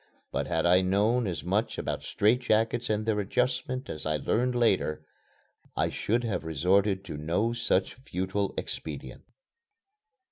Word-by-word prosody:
But - - -1
had 80 0 0
I 90 +1 +6
known 105 +5 +2
as 85 -4 -3
much 100 +6 0
about - - -2
strait 110 +5 +2
jackets 115 0 +1
and 105 0 0
their 110 -2 +1
adjustment 130 +5 -1
as 75 - -5
I 75 0 +1
learned 125 - 0
later, 95 -10 +1 0.7
I - - +2
should 120 +3 0
have 110 -6 -2
resorted 95 +5 +2
to 80 -6 -6
no 85 +10 0
such 95 -5 +1
futile 100 -5 -2
expedient. - - -5
105 Hz, 145 wpm, -28 LUFS, 90-120 Hz, 0.7 s, I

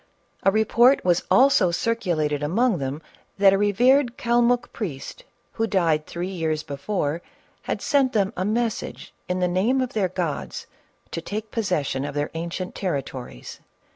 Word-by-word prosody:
A - - +4
report 225 +5 +4
was 175 -1 +3
also 260 -8 +5
circulated 170 -8 0
among 195 +6 +1
them 140 +3 -4 0.3
that 195 -1 +6
a - - +3
revered 245 +5 +3
Calmuck 240 +1 +2
priest, 180 - -6 0.3
who 225 0 -1
died 165 -7 +1
three 175 +2 -4
years 160 -4 -2
before, 145 +2 -2 0.4
had - - -4
sent 275 -4 +3
them 200 -3 +1
a 185 - -1
message 225 +2 -2 0.2
in 180 0 -1
the 180 - +3
name 195 +9 +1
of 255 -1 -2
their 200 -4 +1
gods 175 -5 -4 0.5
to 165 - -4
take 215 +5 -5
possession 165 - -1
of 145 0 -5
their 145 0 -1
ancient 170 +3 -4
territories. 130 - -5
185 Hz, 150 wpm, -24 LUFS, 160-230 Hz, 0.5 s, that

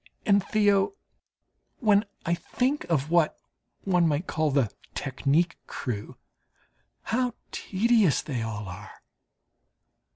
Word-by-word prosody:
And, 200 -4 +4
Theo, 205 - +2 0.8
when 210 -4 +3 0.2
I 170 - +2
think 255 - -1
of 155 -2 0
what 170 -3 +3 0.5
one 180 -3 +3
might 155 +3 0
call 155 -3 0
"the 135 -7 +1 0.2
technique 145 +5 0
crew" 110 -5 -5 0.9
how 245 +1 0 0.2
tedious 210 -4 +2
they 130 -6 -3
all 105 -2 -4
are! 95 +4 -8
170 Hz, 105 wpm, -27 LUFS, 135-205 Hz, 0.9 s, And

